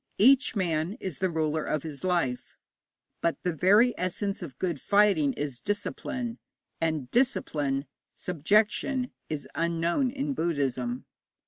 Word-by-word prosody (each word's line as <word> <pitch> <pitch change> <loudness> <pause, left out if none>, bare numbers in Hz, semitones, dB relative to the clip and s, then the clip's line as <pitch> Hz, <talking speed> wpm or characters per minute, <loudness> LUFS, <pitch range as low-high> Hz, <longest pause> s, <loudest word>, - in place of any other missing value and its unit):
Each 255 +3 +5
man 170 -2 0
is 190 - -6
the 190 - +1
ruler 155 -1 0
of 155 - -1
his 155 -2 -7
life, 170 -9 -1 0.6
but 170 - +1
the 180 - 0
very 205 - +5
essence 195 +3 -2
of 140 -8 -8
good 170 -5 -2
fighting 200 -8 +4
is 140 -5 -4
discipline, 230 - -3 0.4
and 155 -6 -1
discipline, 150 - +1 0.3
subjection, 215 - +1 0.2
is 150 -3 -4
unknown 170 - +1
to 280 +1 -1
Buddhism. 135 - -1
170 Hz, 125 wpm, -28 LUFS, 150-210 Hz, 0.6 s, Each